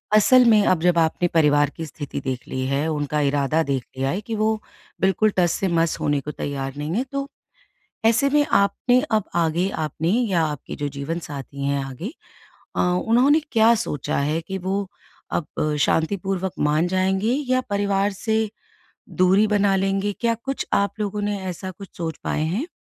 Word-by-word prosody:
असल 250 +4 +6
में 215 -2 +6
अब 180 -3 +2
जब 175 0 +3
आपने 165 +2 +2
परिवार 145 -4 +3
की 165 - -4
स्थिति 145 -1 -6
देख 130 -2 -4
ली 130 0 -3
है 140 +3 0
उनका 150 -1 -1
इरादा 145 +2 +1
देख 135 -4 -2
लिया 135 +1 0
है 190 +8 -2
कि 225 +1 -5
वो 215 +1 +1 0.5
बिल्कुल 195 +3 +3
टस-से-मस 170 -2 +1
होने 145 -2 +1
को 150 - -5
तैयार 135 -2 -4
नहीं 150 +2 -3
है, 240 - +1
तो 275 +1 -4 0.8
ऐसे 230 +5 +4
में 295 +1 +3
आपने 245 +5 +3
अब 215 -2 +2
आगे 170 +2 +1
आपने 160 -1 -2
या 205 -7 +2
आपके 150 -3 -4
जो 145 - -3
जीवनसाथी 140 -1 -5
हैं 140 0 0
आगे 135 - -6 0.6
अ, - - +1
उन्होंने 235 - +3
क्या 225 0 +5
सोचा 210 - -2
है 150 +3 0
कि 190 +3 -5
वो 190 +2 -2 0.4
अब 150 -1 -1
शांतिपूर्वक 190 +4 0
मान 150 +3 +2
जाएँगे 190 +4 +1 0.2
या 255 - +3
परिवार 200 0 +1
से 220 +2 -1 0.6
दूरी 190 +3 +3
बना 205 -2 +2
लेंगे? 195 +1 0
क्या 230 +3 0
कुछ 270 +4 -4
आप 200 0 +2
लोगों 210 0 -2
ने 205 0 -1
ऐसा 185 +1 -5
कुछ 195 +1 -11
सोच 165 -2 -4
पाए 150 - -1
हैं? 195 - -1
185 Hz, 170 wpm, -23 LUFS, 150-210 Hz, 0.8 s, असल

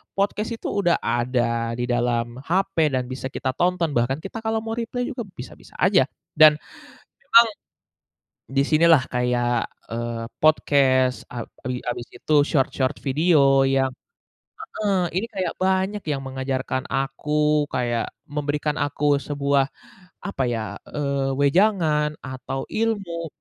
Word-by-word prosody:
podcast 205 +3 0
itu - - -7
udah 175 -4 +3
ada 115 -1 0
di - - 0
dalam 120 0 -1
HP 195 +3 0 0.2
dan 130 - 0
bisa 130 0 -4
kita 130 -2 -1
tonton, 175 -2 +1
bahkan 130 +5 +1
kita 210 +4 -6
kalau 220 0 +1
mau 225 - -5
reply 245 +2 -3
juga 250 -3 -4 0.2
bisa-bisa 125 - -11
aja, 180 -7 +3 0.3
dan 155 -1 +9 0.7
emang 235 -4 +7 1.1
di 135 - +5
sini 155 +3 +3
lah 155 -6 +6
kayak, 120 -1 0 0.2
eee, 115 0 -3 0.2
podcast 135 -4 +3
a 120 -2 -4 0.2
bi 125 -1 -3
habis 120 0 -4
itu 155 - -4 0.2
short-short 135 -2 0
video 140 -2 +4
yang 135 -1 +1 0.8
heeh, 205 -2 +1 0.2
ini 210 +5 0
kayak 185 -4 -2
banyak 190 +2 +1
yang 140 -2 -1
mengajarkan 130 0 -2
aku 150 +2 +1
kayak 120 -2 -1 0.2
memberikan 150 0 -2
aku 145 0 -2 0.2
sebuah, 140 -1 +1 0.6
apa 135 -9 -2
ya, 115 -2 -3 0.2
eee, 140 -2 -1
wejangan 150 -1 +2
atau 130 0 -5
ilmu 195 -7 -2
140 Hz, 130 wpm, -23 LUFS, 130-175 Hz, 1.1 s, dan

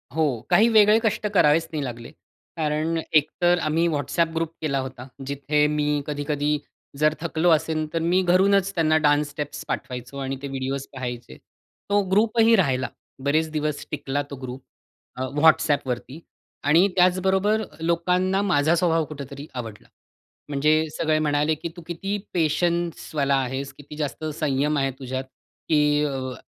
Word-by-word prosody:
हो, 150 -7 +1
काही 220 - +5
वेगळे 215 0 +6
कष्ट 215 -1 0
करावेच 160 -2 +4
नाही 150 -3 -2
लागले. 120 +1 -7 0.5
कारण 155 +1 0 0.2
एकतर 175 +3 +3
आम्ही 160 +2 +1
WhatsApp 160 +2 0
ग्रुप 165 -1 -1
केला 140 -3 0
होता. 130 -1 -7 0.2
जिथे 140 +2 +1
मी 150 -1 0
कधी-कधी 145 0 -1 0.4
जर 155 0 +4
थकलो 170 +1 +1
असेन, 155 0 +1
तर 165 - 0
मी 175 +3 +2
घरूनच 195 +2 +3
त्यांना 155 -2 +3
डान्स 150 -1 +2
स्टेप्स 145 0 -6
पाठवायचो 125 +2 -5
आणि 135 0 -3
ते 140 - -4
व्हिडिओज 135 0 -4
पाहायचे. 120 - -6 0.5
तो 205 0 +3
ग्रुप 215 +3 +2
ही 225 0 +6
राहिला. 135 -10 +1 0.4
बरेच 155 +3 +1
दिवस 150 -1 -2
टिकला 145 -1 -2
तो 140 - -6
ग्रुप 130 0 -7 0.5
अ, 130 - -6 0.2
WhatsAppवरती. 145 -4 +2 0.4
आणि 165 +7 +5
त्याचबरोबर 190 +4 +3 0.2
लोकांना 180 +3 +1
माझा 160 -4 +2
स्वभाव 165 -2 +2
कुठेतरी 140 -1 -8
आवडला. 115 -4 -7 0.6
म्हणजे 145 +2 +2 0.2
सगळे 155 -1 +1
म्हणाले 150 0 +1
की 170 - -6
"तू 175 - -9
किती 195 +4 -3 0.2
पेशन्सवाला 165 -3 0
आहेस, 135 +1 -2
किती 145 +1 -11
जास्त 150 +1 -4
संयम 145 0 0
आहे 135 -1 +1
तुझ्यात, 130 0 -4 0.5
की 150 -1 +3
अ, 130 -3 -3
150 Hz, 145 wpm, -24 LUFS, 140-170 Hz, 0.6 s, वेगळे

